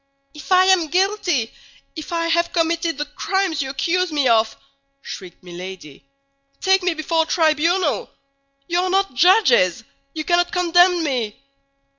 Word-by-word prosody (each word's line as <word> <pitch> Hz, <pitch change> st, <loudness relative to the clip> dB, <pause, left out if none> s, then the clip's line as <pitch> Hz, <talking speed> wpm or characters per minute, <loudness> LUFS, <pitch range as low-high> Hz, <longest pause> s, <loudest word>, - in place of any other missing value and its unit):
"If 300 Hz, +4 st, -12 dB
I 370 Hz, 0 st, +5 dB
am 375 Hz, -4 st, +3 dB
guilty, 360 Hz, -, 0 dB, 0.4 s
if 315 Hz, +2 st, -8 dB
I 335 Hz, -1 st, -1 dB
have 340 Hz, +1 st, 0 dB
committed 330 Hz, -2 st, -1 dB
the 295 Hz, -, -3 dB
crimes 340 Hz, +2 st, -2 dB
you 265 Hz, -, -4 dB
accuse 345 Hz, +6 st, -1 dB
me 290 Hz, -3 st, +1 dB
of," 225 Hz, -1 st, +2 dB, 0.5 s
shrieked 185 Hz, -2 st, -10 dB
Milady, 180 Hz, -4 st, -10 dB, 0.5 s
"take 380 Hz, 0 st, +2 dB
me 360 Hz, -2 st, -1 dB
before 325 Hz, +1 st, 0 dB
a -, -, 0 dB
tribunal. 325 Hz, +1 st, +1 dB, 0.6 s
You 345 Hz, 0 st, 0 dB
are 370 Hz, +1 st, 0 dB
not 390 Hz, -3 st, 0 dB
judges! 255 Hz, -, +3 dB, 0.3 s
You 310 Hz, -, -3 dB
cannot 350 Hz, +1 st, +1 dB
condemn 355 Hz, 0 st, +3 dB
me!" 245 Hz, -8 st, -3 dB
335 Hz, 145 wpm, -20 LUFS, 280-360 Hz, 0.6 s, I